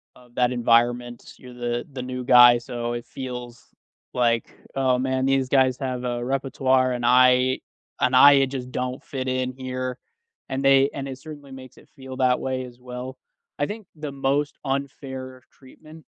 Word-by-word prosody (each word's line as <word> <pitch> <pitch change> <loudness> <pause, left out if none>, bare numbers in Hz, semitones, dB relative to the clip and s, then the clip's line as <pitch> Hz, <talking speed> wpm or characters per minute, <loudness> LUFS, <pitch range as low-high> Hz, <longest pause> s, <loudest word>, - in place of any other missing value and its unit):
of 125 -1 -20
that 125 0 +2
environment, 120 0 +1
you're 125 -1 -13
the 120 0 -3
the 130 - -5
new 125 0 -5
guy 125 -1 +8
so 120 -1 -4
it 120 0 -4
feels 125 -2 -8 0.5
like, 120 -2 0 0.2
"Oh, 130 -2 +2
man, 130 0 0
these 135 -1 +1
guys 130 -2 +3
have 130 -2 -3
a 120 -1 -2
repertoire, 130 -1 +1
and 120 -1 -4
I 125 +1 +4 0.4
and 125 0 +3
I, 140 +1 +8
uh, - - +3
just 130 -1 -6
don't 125 +1 -4
fit 130 -2 -5
in 130 0 -1
here." 130 -1 -5 0.5
And 135 +1 -3
they 135 0 +5
and 140 -1 -5
it 130 -1 -6
certainly 145 -3 -11
makes 130 -1 -12
it - - -19
feel 130 -1 -9
that 130 -1 +2
way 130 -1 -3
as 120 0 -14
well. 125 +1 -8 0.4
I 145 - +2
think 210 0 -7
the 150 -2 -6
most 140 +2 -1
unfair 130 -1 -5
treatment 155 +4 -16
130 Hz, 175 wpm, -24 LUFS, 125-135 Hz, 0.5 s, guy